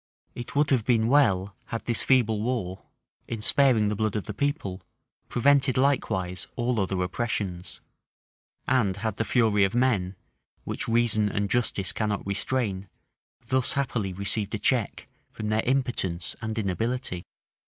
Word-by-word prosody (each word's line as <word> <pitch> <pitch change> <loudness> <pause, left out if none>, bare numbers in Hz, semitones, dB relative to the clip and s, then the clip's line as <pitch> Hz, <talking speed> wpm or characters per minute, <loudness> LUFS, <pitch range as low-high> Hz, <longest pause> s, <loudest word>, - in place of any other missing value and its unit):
It 120 +2 -8
would 145 0 +2
have 125 -5 +3
been 115 -1 +2
well, 100 -9 +3
had 115 0 -5
this 120 -2 0
feeble 115 -5 +3
war, 110 -6 -3 0.4
in 115 - -4
sparing 115 -1 +3
the 105 - -1
blood 110 0 -1
of 105 - -1
the 105 - -6
people, 105 - -2 0.5
prevented 140 +1 +3
likewise 110 -9 0
all 120 -1 0
other 95 -1 -1
oppressions; 95 -2 -3 0.9
and 105 -8 +2
had 110 0 -3
the - - +1
fury 110 -3 +3
of 95 +4 +1
men, 105 -7 +1 0.5
which - - -4
reason 115 -2 +3
and 100 -1 -1
justice 105 -5 0
cannot 105 -2 -2
restrain, 100 -1 -1 0.6
thus 130 -1 +1
happily 120 -8 -1
received 100 +3 -2
a - - -1
check 115 +1 0 0.2
from 105 -1 -5
their 110 0 +2
impotence 120 -10 -1
and 110 0 -4
inability. 110 -1 -2
110 Hz, 145 wpm, -26 LUFS, 100-125 Hz, 0.9 s, have